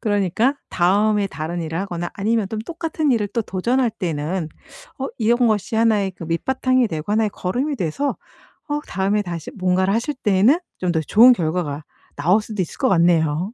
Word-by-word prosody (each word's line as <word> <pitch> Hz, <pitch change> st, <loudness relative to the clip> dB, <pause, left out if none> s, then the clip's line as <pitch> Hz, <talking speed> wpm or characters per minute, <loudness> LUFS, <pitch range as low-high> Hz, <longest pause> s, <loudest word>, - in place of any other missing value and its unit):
그러니까 205 Hz, -, +1 dB, 0.2 s
다음에 205 Hz, +3 st, +2 dB
다른 170 Hz, -1 st, -5 dB
일을 165 Hz, 0 st, -4 dB
하거나 175 Hz, -3 st, -4 dB
아니면 215 Hz, 0 st, 0 dB
똠 220 Hz, -, -4 dB
똑같은 320 Hz, +2 st, -2 dB
일을 210 Hz, -3 st, 0 dB
또 230 Hz, +3 st, -2 dB
도전할 235 Hz, +6 st, 0 dB
때는 170 Hz, -3 st, -3 dB, 0.5 s
어 270 Hz, -, -2 dB
이런 240 Hz, +2 st, +3 dB
것이 215 Hz, 0 st, 0 dB
1 225 Hz, -1 st, +3 dB
의 195 Hz, -1 st, -1 dB
그 165 Hz, -, -7 dB
밑바탕이 255 Hz, +8 st, +1 dB
되고 160 Hz, +4 st, -4 dB
1 220 Hz, +1 st, +3 dB
의 210 Hz, -, -1 dB
거름이 255 Hz, +11 st, -2 dB
돼서 195 Hz, -, -2 dB, 0.5 s
어 295 Hz, 0 st, -1 dB
다음에 195 Hz, +2 st, 0 dB
다시 170 Hz, -5 st, -6 dB
뭔가를 185 Hz, +1 st, +1 dB
하실 235 Hz, +7 st, -1 dB
때에는 215 Hz, -, +3 dB, 0.2 s
좀 180 Hz, -1 st, 0 dB
더 160 Hz, -, +1 dB
좋은 225 Hz, -, +6 dB
결과가 160 Hz, -5 st, -2 dB, 0.3 s
나올 180 Hz, +9 st, +3 dB
수도 210 Hz, -2 st, -4 dB
있을 175 Hz, -, -5 dB
것 260 Hz, -, +1 dB
같네요. 170 Hz, +1 st, +2 dB
200 Hz, 350 characters per minute, -21 LUFS, 175-230 Hz, 0.5 s, 좋은